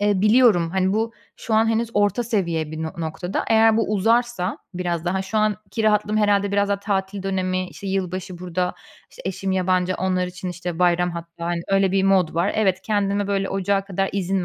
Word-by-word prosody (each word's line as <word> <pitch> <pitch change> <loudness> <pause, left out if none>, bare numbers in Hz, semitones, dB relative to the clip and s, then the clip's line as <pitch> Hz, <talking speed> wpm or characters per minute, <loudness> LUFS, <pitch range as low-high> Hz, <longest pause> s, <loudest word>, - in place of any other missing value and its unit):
eee, 205 -2 +2
biliyorum, 210 -6 +4
hani, 190 +1 +1
bu, 225 +2 0 0.2
şu 225 - -3
an 220 +1 +4
henüz 225 +1 0
orta 205 +2 +2
seviye 170 -9 -1
bir 160 0 -5
no 160 - -4
noktada. 170 +2 -3
Eğer 225 0 +5
bu 225 -2 0
uzarsa, 225 -1 +1 0.2
biraz 175 -2 -2
daha 190 +2 0
şu 195 +3 -2
anki 215 +1 -1
rahatlığım 210 0 +2
herhâlde, 200 -1 +2
biraz 200 0 +2
daha 200 0 0
tatil 195 -1 -2
dönemi, 185 -1 -1
işte, 200 - -10
yılbaşı 185 -1 -3
burada, 180 0 -2 0.4
işte, - - -13
eşim 190 +1 -2
yabancı, 185 0 +1
onlar 185 -1 0
için, 185 +1 -6
işte, 175 -1 -5
bayram 175 0 +3
hatta, 170 0 -7
hani, 170 0 -1
öyle 195 -1 +2
bir 195 0 +2
mod 190 -5 +3
var. 175 +4 +1
Evet, 190 -4 +1
kendime 205 -1 0
böyle 195 -1 -1
ocağa 195 0 0
kadar 195 0 -1
izin 195 -1 -1
190 Hz, 195 wpm, -22 LUFS, 180-205 Hz, 0.4 s, Eğer